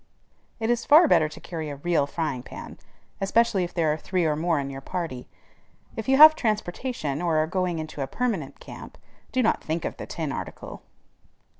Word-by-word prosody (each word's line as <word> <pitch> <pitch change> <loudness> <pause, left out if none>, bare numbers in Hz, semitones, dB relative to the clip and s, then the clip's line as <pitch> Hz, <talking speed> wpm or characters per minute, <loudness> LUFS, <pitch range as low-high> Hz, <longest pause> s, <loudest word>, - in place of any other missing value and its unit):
It 225 +1 0
is 240 - 0
far 315 +3 +7
better 155 - +4
to 155 - -11
carry 160 -3 -6
a 145 - -5
real 145 0 0
frying 150 -5 -3
pan, - - -10 0.4
especially 210 0 +2
if 175 - -4
there 160 -4 +1
are - - -3
three 180 +1 -1
or 155 -1 +1
more 165 0 0
in 140 0 -4
your 135 0 -7
party. 135 -5 -5 0.7
If 225 +2 -5
you 270 - +5
have 310 +2 +11
transportation, 215 - -2
or 170 -3 +1
are 155 - +3
going 180 0 -1
into 155 -2 -6
a 135 - -2
permanent 200 - -3
camp, - - -11 0.3
do 255 -1 +1
not 225 - +1
think 160 +2 -3
of - - -4
the - - -7
tin 160 -4 -4
article. - - -7
170 Hz, 195 wpm, -25 LUFS, 150-220 Hz, 0.7 s, have